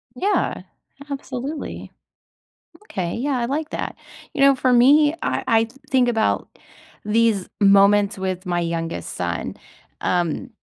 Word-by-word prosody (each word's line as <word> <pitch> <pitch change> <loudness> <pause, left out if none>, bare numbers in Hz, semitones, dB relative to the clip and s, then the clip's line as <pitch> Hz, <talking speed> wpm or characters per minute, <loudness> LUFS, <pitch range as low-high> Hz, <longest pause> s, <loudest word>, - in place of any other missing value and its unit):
Yeah, 400 +10 0 0.5
absolutely. 275 +2 -6 0.9
Okay, 175 - -4
yeah, 265 +1 -1
I 235 - -1
like 300 +4 -3
that. - - -4 0.4
You 290 - -4
know, 275 0 +6
for 255 -1 +1
me, 290 +5 +5
I - - -1
I 225 0 +3 0.2
think 255 -2 +3
about 225 -2 0 0.6
these 215 -2 +2
moments 200 0 +5
with 185 0 -3
my 175 -1 0
youngest 165 -1 -3
son, 85 -1 -3 0.5
um 175 -3 -1
225 Hz, 125 wpm, -22 LUFS, 185-270 Hz, 0.9 s, know